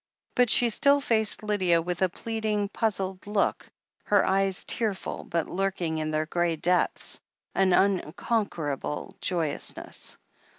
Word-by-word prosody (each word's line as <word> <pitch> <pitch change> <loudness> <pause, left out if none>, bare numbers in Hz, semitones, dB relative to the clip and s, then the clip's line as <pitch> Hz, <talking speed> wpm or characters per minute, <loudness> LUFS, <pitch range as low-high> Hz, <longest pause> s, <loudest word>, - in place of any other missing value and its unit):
But 245 -1 +3
she 240 -1 +5
still 280 +5 +4
faced 220 -6 +2
Lydia 190 -5 +2
with 175 +2 -3
a 185 - +3
pleading, 215 0 -2
puzzled 195 -4 -2
look, 205 -1 0 0.4
her 205 -2 +3
eyes 195 -1 +2
tearful, 215 -5 -1
but, 170 -2 -1
lurking 180 -4 -1
in 155 0 -2
their 155 0 0
grey 170 +1 0
depths, 180 +3 0 0.3
an 190 -1 +3
unconquerable 175 - 0
joyousness. 170 -6 -3
190 Hz, 125 wpm, -27 LUFS, 170-210 Hz, 0.4 s, she